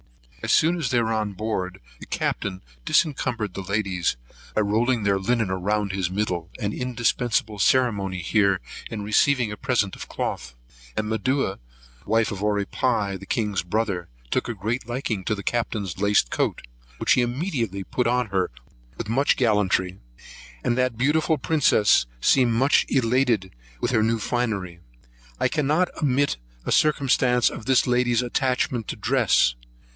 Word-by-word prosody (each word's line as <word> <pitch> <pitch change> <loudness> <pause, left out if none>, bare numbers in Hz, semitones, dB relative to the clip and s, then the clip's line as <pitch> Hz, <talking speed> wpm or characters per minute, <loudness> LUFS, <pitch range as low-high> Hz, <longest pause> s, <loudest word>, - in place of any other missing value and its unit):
As - - -1
soon 165 +3 +4
as 145 -7 -1
they 120 - +2
were 115 -1 0
on 105 -2 -1
board, 95 -3 -3 0.2
the - - -11
Captain 95 -2 -2 0.2
debarassoit 120 - +1
the 95 - -5
ladies, 95 - -1 0.4
by - - +3
rolling 110 +3 +1
their 100 -1 +2
linen 115 +1 0
round 100 +2 -1
his 95 -2 -1
middle; 90 -4 -2
an 105 -3 -2
indispensable 120 -3 -1
ceremony 100 -6 +2
here 100 +1 +2 0.3
in 105 -2 -5
receiving 120 +3 +2
a - - -4
present 120 -7 0
of - - -8
cloth: - - -4 0.4
and 110 0 0
Medua, 110 -1 0 0.5
wife 115 +1 +2
to - - -4
Oripai, 105 0 0
the 100 - -12
king's 105 -4 0
brother, 95 -1 -2 0.2
took - - 0
a 120 - -3
great 110 +5 -3
liking 120 -5 -2
to 110 - 0
the 100 - -7
Captain's 105 -7 -2
laced 100 -10 +2
coat, - - -1 0.3
which - - 0
he 130 - +3
immediately 120 - -2
put 125 +5 -1
on 125 -2 +1
her 95 -1 0 0.5
with - - -5
much 135 +6 +2
gallantry; 100 -5 +1 0.6
and 120 - +1
that 125 -2 0
beautiful 155 +5 +2
princess 130 - +3
seemed 125 - +4
much 135 +5 +3
elated 120 -6 +1 0.3
with - - -1
her 110 -3 +3
new 115 +1 +2
finery. 105 -7 -2 0.6
I - - +3
cannot 155 +5 +1
ommit 140 - +1 0.3
a - - -2
circumstance 130 -5 +3
of 110 - -9
this 130 -2 +4
lady's 125 -1 +2
attachment 125 -2 -1
to - - -4
dress. - - +3
110 Hz, 155 wpm, -24 LUFS, 100-125 Hz, 0.6 s, soon